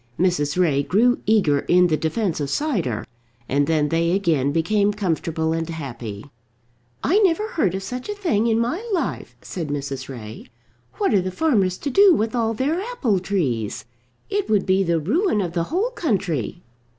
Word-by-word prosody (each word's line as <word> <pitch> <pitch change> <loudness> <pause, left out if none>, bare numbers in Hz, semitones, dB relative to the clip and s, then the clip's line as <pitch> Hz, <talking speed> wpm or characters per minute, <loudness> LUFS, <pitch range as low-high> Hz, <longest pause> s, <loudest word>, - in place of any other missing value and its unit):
Mrs. 175 -3 +1
Ray 150 -6 +3
grew 215 - +2
eager 195 -10 +3
in 180 +5 +4
the 165 -3 +2
defence 165 +3 -1
of 145 -2 -2
cider, 175 - -1 0.4
and 140 +1 +1
then 155 -2 +1
they 170 +2 +1
again 160 -8 +1
became 200 +6 +2
comfortable 165 -5 -1
and 165 0 -2
happy. 120 -10 -6 0.8
"I 375 +9 +3
never 415 +2 +2
heard 200 - 0
of 195 - -4
such 250 - -6
a 415 - -2
thing 235 - +1
in 225 -1 +2
my 245 - -1
life," 340 - -3
said 170 -4 -5
Mrs. 140 -2 -4
Ray. 110 -4 -9 0.5
"What - - +1
are 195 - +4
the 185 - -3
farmers 195 - +1
to 285 - -4
do 390 +4 +6
with 220 -1 -1
all 225 -2 0
their 295 - 0
apple 350 - 0
trees? 135 - -2 0.4
It 410 -1 -2
would 210 -3 +2
be 190 0 +3
the 170 -3 +1
ruin 245 - +1
of 175 -4 -2
the 170 -1 0
whole 395 - -1
country." 185 - -2
185 Hz, 175 wpm, -22 LUFS, 155-240 Hz, 0.8 s, do